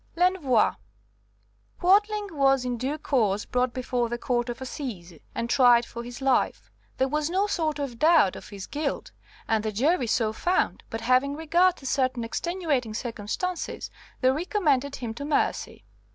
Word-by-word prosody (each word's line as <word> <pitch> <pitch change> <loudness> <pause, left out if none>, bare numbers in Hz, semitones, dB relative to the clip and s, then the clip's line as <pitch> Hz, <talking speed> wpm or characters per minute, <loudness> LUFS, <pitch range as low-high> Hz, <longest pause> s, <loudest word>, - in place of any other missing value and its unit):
L'Envoi 340 - +3 1.1
Quadling 415 +3 +3
was 270 -3 +3
in 250 -1 -1
due 265 +6 -2
course 215 -9 0
brought 250 0 0
before 245 -1 -2
the 240 - -2
Court 240 0 -1
of 240 - -5
Assize 215 - -7 0.2
and 235 - -2
tried 240 -2 +5
for 235 - -7
his 245 +2 -9
life. 265 -1 +1 0.3
There 265 - +2
was 300 +2 -1
no 380 +3 +1
sort 320 -7 -1
of 270 -5 -5
doubt 310 - +5
of - - -10
his 200 -2 -7
guilt, 295 -1 -3 0.4
and 220 -1 +1
the 215 - -1
jury 260 - +1
so 220 -1 +1
found, 355 +10 0
but, 225 - -5
having 255 +4 +2
regard 340 +4 +3
to 270 - -14
certain 255 -3 0
extenuating 285 - -2
circumstances, 240 - -4 0.3
they 255 0 +5
recommended 290 - 0
him 235 -3 -5
to 260 - -7
mercy. 290 0 -1
265 Hz, 160 wpm, -26 LUFS, 235-315 Hz, 1.1 s, tried